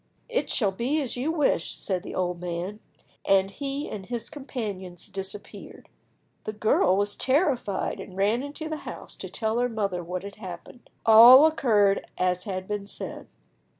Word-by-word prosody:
"It - - -1
shall 205 -5 +1
be 250 +10 -1
as 270 -5 -3
you 265 +6 -1
wish," 295 - +1
said 185 -3 -2
the - - -8
old 180 -1 -1
man, 180 +4 -4 0.4
and 195 0 +3
he 280 +5 -4
and 200 - -6
his 240 -2 -5
companions 205 - -6
disappeared. 195 0 -8 0.6
The 215 - -3
girl 210 -3 +3
was 205 0 0
terrified, 260 - 0
and 185 - -9
ran 210 +5 +2
into 290 +3 -6
the 315 0 -3
house - - -8
to - - -7
tell 220 +1 -1
her 245 0 +1
mother 200 -6 -2
what 180 +2 -5
had 200 0 -9
happened. 190 +4 -10 0.2
All 235 +6 +10
occurred 215 -10 +3
as 180 0 0
had 185 -2 -4
been 205 -1 -4
said. - - -8
210 Hz, 165 wpm, -26 LUFS, 190-250 Hz, 0.6 s, All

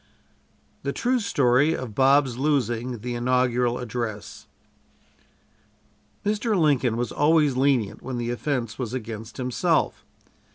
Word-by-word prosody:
THE - - -3
TRUE 255 0 +1
STORY 140 - +2
OF 125 -4 -6
BOB'S 135 0 +3
LOSING 125 -4 -1
THE 120 +1 -4
INAUGURAL 125 0 +1
ADDRESS 115 -4 -5 1.8
Mr. 215 +1 0
Lincoln 135 -7 +2
was 120 0 -2
always 150 -2 +3
lenient 130 -5 +1
when 130 -1 -5
the 120 0 -2
offense 120 -3 -3
was 125 -1 -3
against 110 -2 -7
himself. 125 -1 0
125 Hz, 115 wpm, -24 LUFS, 120-140 Hz, 1.8 s, BOB'S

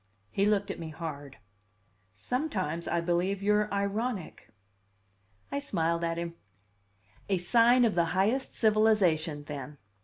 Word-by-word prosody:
He 200 - +1
looked 205 -1 +1
at - - -7
me 165 -1 -6
hard. 150 -4 -7 0.7
"Sometimes 185 - -3
I 170 - 0
believe 180 +3 0
you're 210 0 +2
ironic!" 200 - -3 1.0
I 280 - -1
smiled 170 -9 -1
at 165 0 -1
him. 170 0 -5 0.9
"A 195 - +2
sign 235 +7 +4
of 220 - +2
the 170 -1 +2
highest 195 +10 0
civilization, 195 -9 +2
then. 145 0 -7
185 Hz, 125 wpm, -29 LUFS, 165-215 Hz, 1.0 s, sign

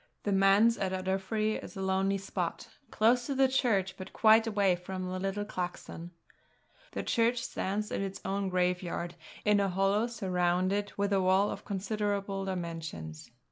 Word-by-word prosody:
The 205 - -1
Manse 195 +4 +5
at 190 -1 -1
Ardiffery 190 +3 -1
is - - -10
a - - -4
lonely 190 +1 +1
spot, 195 - -4 0.2
close 240 +3 +3
to 280 - -2
the 270 0 +5
church, 205 -8 +1
but 185 - -9
quite 220 +1 +5
away 200 -4 +3
from 185 +1 -5
the 185 0 -3
little 195 +2 -2
clachan. 175 -3 -5 0.8
The - - -3
church 235 0 +1
stands 210 +1 -2
in - - -1
its 195 0 -4
own 195 0 -1
graveyard, 180 -1 -1 0.3
in 210 -1 +4
a 200 -1 +2
hollow 195 +4 +2
surrounded 185 -1 0
with 200 0 +1
a 195 - +3
wall 190 +2 +3
of - - -7
considerable 200 -1 -2
dimensions. 165 - -5
195 Hz, 160 wpm, -30 LUFS, 185-210 Hz, 0.8 s, Manse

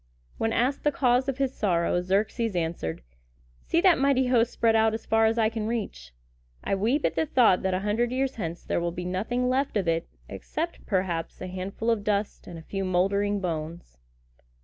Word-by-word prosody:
When 225 - +1
asked 255 +5 0
the 295 - +3
cause 255 -1 +2
of 270 - -2
his 270 -1 0
sorrow, 175 -4 +1
Xerxes 205 +3 0
answered, 160 - -3 0.6
"See 335 - +1
that 370 -5 +5
mighty 270 -1 +3
host 245 -2 +2
spread 225 -1 +2
out 220 0 +3
as 225 - -7
far 225 0 +3
as 225 +1 0
eye 220 -1 +3
can 220 -1 -3
reach! 200 - -4 0.5
I - - -1
weep 230 +10 +1
at - - +1
the 320 - 0
thought 240 -10 +4
that 190 -1 0
a 185 - -2
hundred 220 +4 0
years 265 +1 0
hence 170 -4 -5
there - - -1
will 170 0 -1
be 175 +1 -6
nothing 220 +8 -1
left 260 -1 0
of 190 -4 -1
it 165 0 0 0.2
except, 335 +2 -5
perhaps, 185 -5 -1
a - - -5
handful 190 +5 -3
of 220 -3 0
dust 205 0 -2
and 175 - -8
a 160 - -10
few 195 +3 -4
moldering 200 +2 +1
bones!" 160 - -5
210 Hz, 200 wpm, -26 LUFS, 180-245 Hz, 0.6 s, that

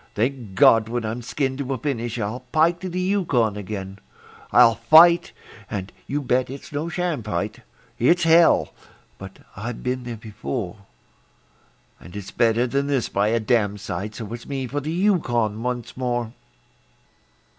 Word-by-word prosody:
Thank 115 -3 -2
God! 110 +3 +5
when 120 -1 -2
I'm 115 +3 -3
skinned 130 +2 -2
to 135 -1 -2
a - - -5
finish 120 -3 -3
I'll 110 +2 -3
pike 165 +3 +3
to 185 +1 -5
the 180 +1 -3
Yukon 170 - +1
again. 100 -1 -6 0.5
I'll 115 - +7
fight 170 +8 +6 0.4
and 95 -1 -5
you 145 +1 -2
bet 125 0 +1
it's 135 +1 -9
no 150 +3 -3
sham 175 -5 -2
fight; 105 -5 -3 0.4
It's 170 +9 +3
hell! 165 +1 +5 0.5
but 95 0 -10 0.2
I've 110 +4 -6
been 125 0 -2
there 120 -2 -5
before; 110 -1 -5 1.2
And 85 +2 -13
it's 100 -1 -7
better 115 +2 +2
than 140 +3 -1
this 135 -4 0
by 100 +1 +1
a 115 +2 +2
damsite 105 -3 -1
So 115 - -6 0.2
me 135 -2 -3
for 140 +4 -3
the 150 +2 -4
Yukon 120 - +1
once 125 -1 -4
more. 120 -3 -2
120 Hz, 155 wpm, -23 LUFS, 110-145 Hz, 1.2 s, I'll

